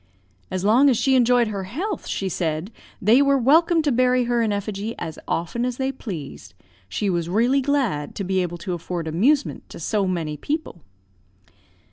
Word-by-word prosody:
"'As 185 +1 -3
long 250 +7 +5
as 250 - +2
she 270 - +2
enjoyed 245 -2 +4
her 200 -3 -4
health,' 345 - -4
she 195 - -2
said, 165 +1 -2 0.3
'they 230 +7 +6
were 280 0 +4
welcome 320 +6 +4
to 295 - +1
bury 250 0 +3
her 240 0 +1
in 220 -2 +1
effigy 205 +2 -3
as 160 -1 -6
often 175 +8 -2
as 250 -1 -2
they 265 0 -1
pleased; 150 - -8 0.3
she 205 - -2
was 170 -3 -1
really 240 +8 +2
glad 250 - -1
to 200 - -3
be 190 0 0
able 175 -1 -3
to 175 +2 -4
afford 170 -1 -4
amusement 250 - +1
to - - -10
so 205 -3 0
many 165 -5 -2
people.' 295 - -4
215 Hz, 180 wpm, -23 LUFS, 180-260 Hz, 0.3 s, they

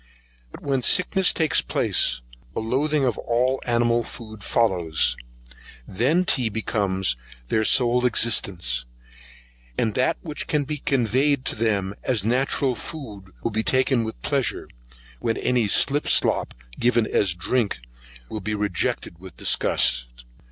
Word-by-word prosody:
But - - -12
when 135 -2 0
sickness 180 +7 +2
takes 160 -2 +2
place, - - +1 0.3
a - - -1
loathing 135 +6 0
of 120 -4 -1
all 125 +3 0
animal 120 0 +2
food 110 -3 -9
follows; 85 - +1 0.7
then 140 - +1
tea 125 -7 +2
becomes 95 - -1 0.3
their 110 - +1
sole 125 +2 +3
existence, 90 - +2 0.9
and 110 - 0
that 130 +3 +1
which 150 -3 -5
can 150 -2 +1
be 150 +2 -4
conveyed 135 +2 +1
to - - +1
them 100 -4 0
as 120 -7 -1
natural 130 +3 +1
food 110 - -8
will 115 - -1
be 110 +1 0
taken 130 0 +2
with 110 0 -6
pleasure, 140 -3 -1 0.5
when 115 - -1
any 125 -4 +1
slip 140 +8 +2
slop, - - +2 0.2
given 120 -1 +3
as 95 -4 +1
drink, 105 +4 0 0.5
will 110 - -6
be 105 +3 -2
rejected 90 -4 -2
with 95 0 -12
disgust. - - +1
115 Hz, 135 wpm, -23 LUFS, 100-130 Hz, 0.9 s, sole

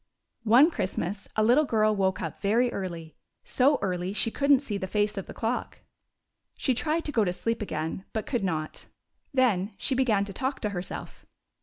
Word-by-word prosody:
One 255 +9 +6
Christmas 195 - -3
a 215 - +2
little 245 +7 +5
girl 215 -4 +2
woke 190 -1 0
up - - -6
very 235 +4 +2
early 170 -4 -6
— - - -54 0.2
so 280 +3 +5
early 180 0 -2
she 225 +2 0
could 280 +4 -1
n't 275 0 +5
see 210 -7 -3
the 190 - -3
face 210 +2 0
of 195 - -5
the - - -8
clock. 230 +2 -3 0.8
She 260 - +1
tried 310 +7 -1
to 295 - -1
go 230 -6 +2
to 180 - 0
sleep 230 +5 -2
again, 160 -1 -4
but 220 - -3
could 240 -6 -1
not. 155 -4 -3 0.4
Then 220 -7 +1
she - - 0
began 230 -6 +2
to 200 - -8
talk 265 +5 -2
to 210 - -1
herself. 180 -2 -7
215 Hz, 195 wpm, -27 LUFS, 190-250 Hz, 0.8 s, One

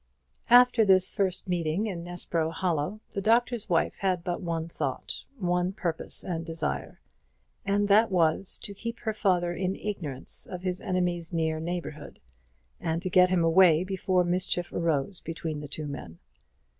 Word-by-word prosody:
After 245 -1 +7
this 190 -2 +5
first 190 -3 0
meeting 175 +2 0
in 180 -6 -4
Nessborough 170 -2 -2
Hollow, 175 +3 -2
the 200 - -3
Doctor's 235 +1 +1
Wife 170 -2 +1
had 185 -3 0
but 175 -1 -3
one 165 -2 -2
thought, 170 - -4
one 180 -2 0
purpose 170 -5 -1
and 165 -3 -3
desire; 165 -2 -4 0.7
and 205 +1 +2
that 215 +3 +5
was, 175 0 +1
to 200 - +4
keep 230 +4 -6
her 220 -2 -2
father 180 -5 +1
in 185 +1 -2
ignorance 155 -11 -5
of 180 -1 -7
his 185 0 -2
enemy's 175 -2 -1
near 160 -2 0
neighbourhood, 165 -3 -6 0.6
and 165 0 -1
to 185 - -3
get 180 0 +6
him 180 -2 +2
away 165 0 +5
before 185 -1 +1
mischief 175 0 -1
arose 165 +2 -1
between 165 -2 -5
the 150 - -7
two 155 +2 -4
men. 140 - -7
180 Hz, 155 wpm, -28 LUFS, 165-195 Hz, 0.7 s, After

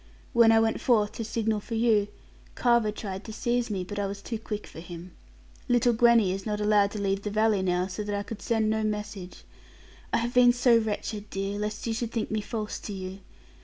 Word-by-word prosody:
When 235 -1 +6
I 225 - +6
went 225 0 +1
forth, 215 -4 +3
to 230 - -5
signal 220 -1 -1
for 230 +3 -6
you, 220 -3 +3 0.5
Carver 235 -3 +3
tried 195 -2 -6
to 220 - -7
seize 240 +2 -1
me; 195 -3 -2
but 205 +3 -6
I 200 - 0
was 200 0 -7
too 225 -2 -4
quick 210 -1 -5
for - - -11
him. 175 +1 -9 0.6
Little 245 0 +4
Gwenny 230 -4 +5
is 195 +1 -3
not 210 -1 -2
allowed 210 -1 +3
to 210 - -4
leave 195 0 0
the 210 - -3
valley 215 -1 +2
now; 180 -1 +1
so 190 +3 -5
that 205 0 -3
I 200 - -2
could 205 0 -8
send 225 -1 +1
no 220 0 0
message. 210 -3 -4 0.7
I - - +3
have 235 +1 -2
been 245 -1 +6
so 245 -1 +4
wretched, 215 -1 -2
dear, 195 +1 -3
lest 210 0 -3
you 230 - -1
should 230 0 -3
think 225 -2 -2
me 215 0 0
false 215 0 -4
to 205 - -6
you. 190 0 -6
215 Hz, 225 wpm, -27 LUFS, 200-230 Hz, 0.7 s, When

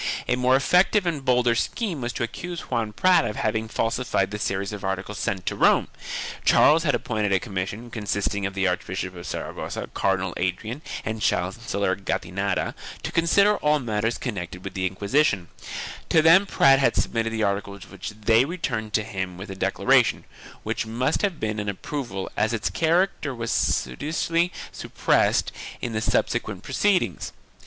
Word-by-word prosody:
1 - - +1
A - - +3
more 125 +1 +3
effective 180 +8 +3
and 155 -5 -1
bolder 125 -2 +3
scheme 170 - -2
was 120 0 -2
to 125 - -3
accuse 175 +8 -5
Juan 115 -3 0
Prat 185 - +4
of 110 -3 -3
having 110 +1 -1
falsified 115 -3 0
the 105 - -4
series 100 +1 -2
of 105 - -7
articles 95 +1 -3
sent 95 -1 -2
to - - -1
Rome. - - +4 0.5
Charles 155 +2 +6
had 145 -4 +2
appointed 105 -3 -1
a 95 - +4
commission, 100 +3 -5
consisting 100 -2 -1
of 95 - -8
the 95 -1 +2
Archbishop 95 +1 -2
of 85 - -8
Saragossa, - - -5
Cardinal 95 -2 0
Adrian 110 +9 -2 0.2
and 110 -1 -3
Chancellor 100 -1 0
Gattinara, 95 0 -2 0.3
to - - -3
consider 200 +5 +4
all 150 0 +2
matters 115 -3 -1
con 125 - -3
nected 90 -2 -6
with 95 - -6
the 95 -1 0
Inquisiton; 100 - +1 0.6
to 160 - +5
them 180 +5 +7
Prat 135 -6 +5
had 135 - +3
submitted 115 -1 0
the 110 -1 -1
articles 100 -1 -2
which 95 -2 -7
they 110 +2 +3
returned 125 - -3
to 105 - +2
him 95 -4 -4
with 95 +1 -7
a - - -6
declaration, - - +2 0.4
which - - -2
must 125 +6 0
have 195 -6 0
been 110 -1 -2
an 105 0 -2
approval 100 -2 -4
as 110 - +1
its 110 - -1
character 165 -4 +1
was 115 -1 -3
studiously 150 - 0 0.2
sup - - -10
pressed - - +3 0.3
in 120 - -4
the 110 - -1
subsequent 110 -4 0
proceedings. 190 +7 0
110 Hz, 170 wpm, -25 LUFS, 95-135 Hz, 0.6 s, them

